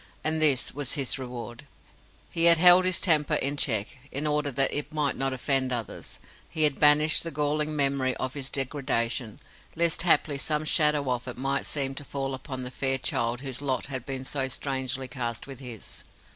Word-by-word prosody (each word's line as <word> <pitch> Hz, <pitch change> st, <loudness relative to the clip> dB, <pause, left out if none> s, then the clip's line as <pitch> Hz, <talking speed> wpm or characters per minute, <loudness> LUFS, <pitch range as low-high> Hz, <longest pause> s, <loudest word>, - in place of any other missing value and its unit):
And 155 Hz, 0 st, 0 dB
this 140 Hz, -5 st, +3 dB
was 145 Hz, -2 st, -2 dB
his 135 Hz, -2 st, 0 dB
reward! 125 Hz, +1 st, -8 dB, 0.6 s
He 165 Hz, 0 st, +2 dB
had 170 Hz, -1 st, +8 dB
held 180 Hz, +2 st, +7 dB
his 185 Hz, -1 st, +2 dB
temper 155 Hz, -5 st, +3 dB
in 140 Hz, +2 st, -1 dB
check, 125 Hz, +1 st, -1 dB
in 145 Hz, +3 st, -3 dB
order 150 Hz, -1 st, 0 dB
that 135 Hz, 0 st, +2 dB
it 145 Hz, -, -1 dB
might 150 Hz, -3 st, -1 dB
not 135 Hz, 0 st, -1 dB
offend 130 Hz, 0 st, 0 dB
others. 120 Hz, -3 st, -4 dB, 0.3 s
He 160 Hz, -2 st, -1 dB
had 150 Hz, -2 st, +3 dB
banished 150 Hz, +1 st, +6 dB
the 165 Hz, -, -1 dB
galling 150 Hz, +1 st, -1 dB
memory 135 Hz, -2 st, +1 dB
of 130 Hz, 0 st, -3 dB
his 135 Hz, -2 st, -6 dB
degradation, 130 Hz, -5 st, -2 dB, 0.4 s
lest 170 Hz, -1 st, +2 dB
haply 160 Hz, -4 st, +2 dB
some 150 Hz, +1 st, -1 dB
shadow 150 Hz, -3 st, +2 dB
of 125 Hz, +1 st, -3 dB
it 125 Hz, -, -7 dB
might 135 Hz, +2 st, -2 dB
seem 135 Hz, -2 st, -2 dB
to 145 Hz, -, -7 dB
fall 135 Hz, -1 st, -4 dB
upon 130 Hz, 0 st, -6 dB
the 125 Hz, -, -6 dB
fair 135 Hz, +1 st, 0 dB
child 120 Hz, -1 st, -1 dB
whose 135 Hz, -1 st, -4 dB
lot 135 Hz, -3 st, -1 dB
had 130 Hz, -2 st, -3 dB
been 135 Hz, -1 st, -5 dB
so 135 Hz, -1 st, -1 dB
strangely 130 Hz, 0 st, -3 dB
cast 120 Hz, -2 st, -5 dB
with 135 Hz, -2 st, -10 dB
his. 120 Hz, -5 st, -8 dB
135 Hz, 190 wpm, -26 LUFS, 130-150 Hz, 0.6 s, had